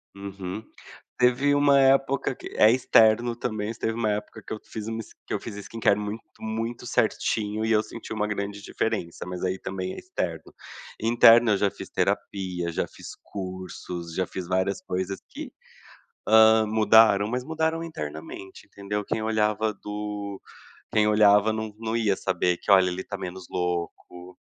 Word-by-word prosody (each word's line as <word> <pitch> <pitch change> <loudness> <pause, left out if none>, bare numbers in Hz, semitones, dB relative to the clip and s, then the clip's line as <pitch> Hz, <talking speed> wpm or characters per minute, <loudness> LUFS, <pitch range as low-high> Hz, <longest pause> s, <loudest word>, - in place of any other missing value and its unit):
Uhum. 100 +1 -6 0.6
Teve 125 +3 +3
uma 145 -1 +5
época 135 0 +3
que - - -9
é 110 - +7
externo 120 -1 +4
também, 110 -2 -3
teve 110 - -2
uma 110 -2 0
época 105 0 -4
que - - -7
eu - - -7
fiz 110 -1 -7 0.4
que - - -3
eu - - 0
fiz 115 - -8
skincare 105 0 0
muito 105 +2 -5 0.2
muito 115 +2 -4
certinho 105 0 0
e 110 - 0
eu 110 -1 +4
senti 110 +1 -9
uma 105 -1 -1
grande 100 -1 -4
diferença. 105 -7 -3
Mas 90 0 -5
aí 95 +1 -1
também 95 -1 -4
é - - -10
externo. 85 - -5 0.5
Interno 115 0 +6
eu 100 - +3
já 100 -1 +2
fiz - - -10
terapia, 90 -3 -2
já - - -1
fiz - - -12
cursos, 90 -3 -7
já 95 0 0
fiz 90 -2 -6
várias 95 +1 0
coisas 95 +1 -3
que, - - -8 0.8
hã, 110 0 +6
mudaram 110 -1 +5
mas 125 +3 -2
mudaram 160 +1 -1
internamente, 80 - -8
entendeu? 105 +1 -4
Quem 110 - -2
olhava 110 0 +1
do 105 -1 -6 0.5
quem 105 -1 +3
olhava 105 0 +5
não 110 -1 -4
não 115 0 -3
ia 105 -4 +1
saber 90 -1 0
que 105 - -6
olha 95 -1 +6
ele 90 +1 -3
está - - -6
menos 90 0 -7
louco, 90 0 -4
105 Hz, 160 wpm, -26 LUFS, 95-110 Hz, 0.8 s, é